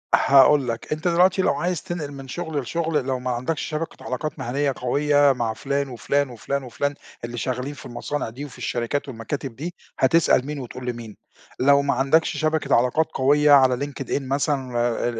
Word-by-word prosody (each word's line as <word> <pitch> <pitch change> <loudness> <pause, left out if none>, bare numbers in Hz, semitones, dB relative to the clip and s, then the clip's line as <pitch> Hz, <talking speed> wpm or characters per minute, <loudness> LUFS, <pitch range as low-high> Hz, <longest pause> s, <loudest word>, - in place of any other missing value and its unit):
هاقول 140 0 +5
لك، 115 +4 -4
أنت 155 +3 -3
دلوقتي 180 +2 +4
لو - - +2
عايز 180 -2 -2
تنقل 160 -5 -5
من 135 -1 -9
شُغل 160 +1 -3
لشُغل 155 0 -1
لو 130 -1 -1
ما 125 0 -2
عندكش 130 +6 -2
شبكة 160 +1 -5
علاقات 150 +4 -4
مهنيّة 135 +3 -1
قوية 145 +2 +3
مع 120 -3 -2
فُلان 140 +2 -2
وفُلان 140 +3 0
وفُلان 135 +3 -3
وفُلان 145 +3 -2 0.3
اللي 120 0 -7
شغالين 130 +4 -3
في - - -12
المصانع 125 +2 -4
دي 130 +6 -7
وفي 140 - -12
الشركات 120 +5 -2
والمكاتب 125 +1 -5
دي 170 +5 -5 0.3
هتسأل 135 -1 +4
مين، 150 -1 -4
وتقول 125 0 -8
لمين؟ 115 -4 -6 0.4
لو 140 +2 +5
ما 140 - +1
عندكش 135 +6 +2
شبكة 155 -3 +1
علاقات 125 +7 +2
قوية 145 +3 +3
على 130 -1 +5
Linked 140 -1 -6
in - - 0
مثلًا 135 -2 -1 0.3
ال 115 - -4
140 Hz, 180 wpm, -23 LUFS, 125-150 Hz, 0.4 s, هاقول